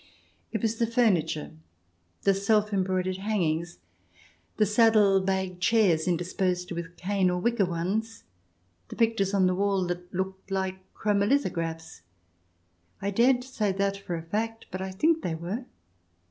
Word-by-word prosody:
It 220 -2 -3
was 225 0 0
the 230 - +1
furniture, 190 -10 +1 0.7
the 195 - +4
self 210 +2 +1
embroidered 185 -1 0
hangings, 175 -5 -1 0.8
the 215 - +4
saddle 210 -2 +5
bag 190 -1 -2
chairs, 185 -6 +3
interspersed 180 +1 -1
with 170 0 -6
cane 190 0 +1
or 180 - 0
wicker 225 -2 +1
ones, 200 +7 -2 0.6
the - - -9
pictures 225 -4 +1
on 190 -2 +4
the 185 - +3
wall 195 0 +1
that 175 0 -5
looked 190 +1 -4
like 190 -1 -3
chromo 205 -1 +1
lithographs 165 - -1 1.0
(I 200 - -2
daren't 245 +4 +3
say 220 -6 -1
that 200 +1 0
for 195 -3 -5
a 165 - -5
fact, 225 +6 -3
but 185 +1 -4
I 190 - -3
think 315 - +2
they 165 - -2
were). 185 +10 -5
190 Hz, 145 wpm, -27 LUFS, 180-215 Hz, 1.0 s, saddle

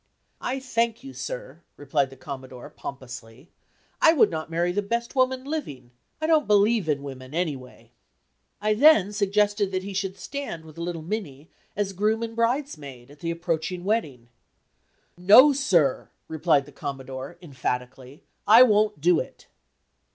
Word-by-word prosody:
"I 260 +2 -2
thank 235 -2 -1
you, 270 0 -9
sir," - - -7 0.2
replied 140 -1 0
the 135 - -13
Commodore, 130 -2 -9
pompously, 125 0 -10 0.5
"I 325 - +7
would 295 - +4
not 160 -1 -4
marry 170 +2 0
the 205 +3 0
best 235 +5 -3
woman 260 0 +1
living; 250 - -6 0.3
I 315 - -2
don't 315 -2 +3
believe 210 -2 +3
in 140 -2 0
women, 135 0 -9
any 165 -4 0
way." 130 -1 -14 0.7
I 215 +1 +1
then 215 -5 +5
suggested 205 0 +1
that 185 0 -2
he 200 0 -6
should 195 0 -3
stand 230 - -6
with 160 +1 -13
little 170 -1 -4
Minnie, 160 -6 -6 0.2
as 200 -1 -2
groom 215 +4 0
and 230 0 -5
bridesmaid, 230 - -2
at 145 - -17
the 165 - -4
approaching 170 +1 -3
wedding. 150 - -2 0.9
"No, 220 +11 +8
sir!" 180 - +1 0.2
replied 160 -3 +1
the 145 - -14
Commodore, 135 +1 -7
emphatically; 130 -1 -5 0.2
"I 225 +4 +9
won't 210 - +2
do 175 +1 +4
it!" - - -8
180 Hz, 150 wpm, -25 LUFS, 140-225 Hz, 0.9 s, I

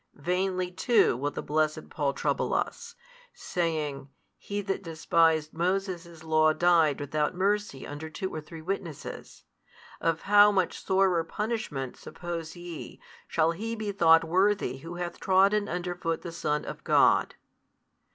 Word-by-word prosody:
Vainly 180 +3 -1
too 230 - +3
will 140 +4 -1
the - - -6
blessed 155 +1 -1
Paul 145 -2 0
trouble - - -1
us, 470 0 -3 0.4
saying, 155 -5 -2 0.3
He 205 0 -4
that 195 -1 -3
despised 160 -2 +1
Moses' 175 -1 -2
law 155 -1 +3
died 165 -3 +3
without 150 +3 -1
mercy 200 -6 -1
under 145 +2 -7
two 190 +4 -5
or 155 - -4
three 160 +1 -11
witnesses: 170 -4 -6 0.6
of 165 -1 0
how 205 +1 +6
much 190 -3 -1
sorer 190 -3 +2
punishment, 165 - -4
suppose 170 -2 -6
ye, 175 -2 -8 0.3
shall 165 0 +2
he 225 +7 -4
be 215 -2 -3
thought 165 -4 +5
worthy 185 -4 +1
who 165 +6 -8
hath 175 0 -5
trodden 195 +2 +3
under 180 0 -3
foot 165 -2 -3
the 170 - -5
Son 150 -3 -2
of - - -7
God? - - +4
170 Hz, 140 wpm, -28 LUFS, 155-190 Hz, 0.6 s, how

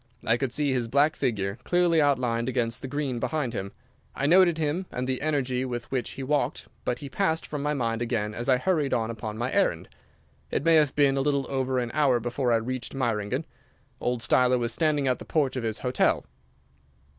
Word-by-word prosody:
I 115 - +3
could 130 0 -2
see 145 +1 0
his 125 -3 0
black 145 +6 +3
figure 105 -5 -1
clearly 175 -2 +3
outlined 125 -4 +1
against 120 -2 -1
the - - -5
green 135 -3 -2
behind 145 -3 -2
him. 100 -3 -4 0.4
I 135 - -1
noted 175 +1 +5
him, 160 +4 -1
and 125 - -3
the 130 0 -2
energy 135 -4 0
with 120 -2 -5
which 130 -3 -1
he 135 - -6
walked 140 0 -1 0.2
but 125 - 0
he 140 - -7
passed 160 +1 0
from 150 -2 -5
my 150 +1 0
mind 115 -3 -1
again 105 -3 -1
as 120 +5 -3
I 130 - +5
hurried 150 -1 +1
on 115 -1 -1
upon 110 -1 -6
my 120 +2 -2
errand. - - +1 0.6
It - - -1
may 165 - +5
have 150 -3 +4
been 140 -2 +3
a - - +2
little 140 -1 +1
over 130 -1 0
an 120 -2 -1
hour 135 -5 +3
before 120 +2 -1
I - - +5
reached 120 +3 -3
Meiringen. 120 +2 -1 0.5
Old 125 -1 -1
Steiler 125 +1 +3
was 120 -1 -1
standing 150 -2 +1
at 125 - +1
the - - -7
porch 145 -5 0
of 130 - -2
his 110 -2 -2
hotel. 125 0 +2
130 Hz, 210 wpm, -26 LUFS, 120-145 Hz, 0.6 s, noted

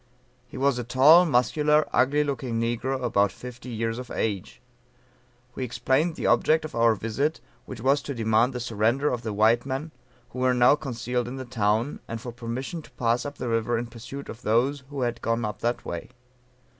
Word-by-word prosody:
He 125 - -10
was 135 -1 +2
a - - -2
tall, 145 +9 +6
muscular, 150 +4 +3
ugly 145 +3 +3
looking 130 -5 -2
negro, 125 +3 -1
about 100 -4 +2
fifty 125 +4 -10
years 115 0 -2
of 125 - -8
age. 100 -4 -3 0.9
We - - -4
explained 135 +7 0
the - - -5
object 160 0 +3
of 155 - -8
our 115 -1 +3
visit, 130 +9 -1 0.3
which 125 -4 -8
was 135 +3 +3
to 140 -1 -5
demand 115 +2 +2
the 125 - -4
surrender 120 +5 +1
of 120 - -3
the 110 - -4
white 110 +3 +3
men, 140 +4 -4 0.4
who 125 - -7
were 130 0 +2
now 125 +1 +6
concealed 125 -4 -3
in 125 - -6
the 130 -1 -6
town, 115 +2 0
and 115 - -5
for 120 +1 -7
permission 125 +7 -5
to - - -17
pass 120 +2 0
up 145 - -8
the 125 - -4
river 115 +1 0
in 120 - -2
pursuit 120 +4 -9
of 115 - -9
those 130 +5 +1
who 140 -2 -5
had 120 -1 -2
gone 115 0 0
up 105 - -5
that 120 +1 -2
way. 85 -1 -5
125 Hz, 195 wpm, -26 LUFS, 115-135 Hz, 0.9 s, tall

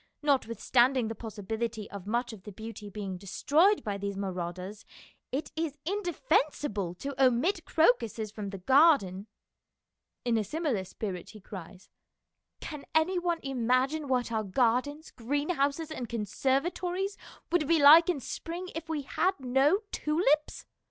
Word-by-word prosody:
Notwith 270 -6 +1
standing 250 -1 +3
the - - -3
possibility 220 0 -4
of 200 -1 -8
much 240 +2 -1
of 210 - -11
the 210 - -9
beauty 220 0 -8
being 195 -3 -5
destroyed 310 - +2
by 200 -2 -3
these 200 0 -4
marauders, 185 +1 -5 0.5
it 285 +4 -3
is 320 -2 -2
indefensible 300 - 0
to 275 +6 -2
omit 310 +9 +2
crocuses 235 -7 +2
from 210 -2 -5
the 195 - -6
garden." 220 - +4 1.0
In 235 -2 +2
a - - 0
similar 260 - -2
spirit 185 -2 -6
he 215 - -12
cries, 190 -1 -11 0.4
" - - -54
Can 300 -3 -7
any 350 +4 +3
one 345 -1 -1
imagine 265 +3 0
what 250 -3 0
our 220 -1 0
gardens, 255 - 0
greenhouses, 285 +4 -1
and 250 -7 -5
conservatories 345 - -1 0.4
would 340 -4 +2
be 335 - +4
like 315 +4 +9
in 340 -5 +1
spring 340 +8 -6
if 325 0 -6
we 305 -3 -2
had 365 +7 0
no 270 - +3
tulips? 300 -1 +1
255 Hz, 145 wpm, -29 LUFS, 210-315 Hz, 1.0 s, like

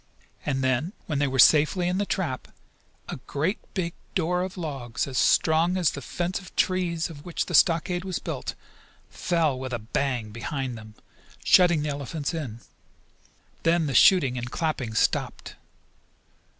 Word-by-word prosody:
And 135 -2 0
then, 130 - 0
when 150 -7 -2
they 145 - +2
were 135 0 -2
safely 155 +7 +5
in 180 +2 0
the 205 - -1
trap, 155 -9 -2 0.6
a - - -5
great 160 +9 -1 0.2
big 170 -3 -2 0.2
door 180 +2 +1
of 185 0 -5
logs, 135 -8 -3
as 130 -3 -2
strong 165 +3 +3
as 175 -4 +2
the 140 - -7
fence 175 +6 -3
of 185 - -14
trees 175 -3 0
of 145 -2 -11
which 175 - -3
the 175 - -7
stockade 175 +2 +3
was 185 -2 -3
built, - - -5 0.6
fell 160 -7 0
with 130 -1 -5
a - - 0
bang 120 0 -2
behind 130 +3 -4
them, 110 -1 -12 0.5
shutting 175 -4 +5
the 150 - -2
elephants 145 +2 -4
in. 125 -8 -5 1.0
Then 165 0 +2
the 140 - -2
shooting 135 -3 +5
and 120 0 -5
clapping 130 -8 -2
stopped. - - 0
155 Hz, 160 wpm, -26 LUFS, 130-175 Hz, 1.0 s, safely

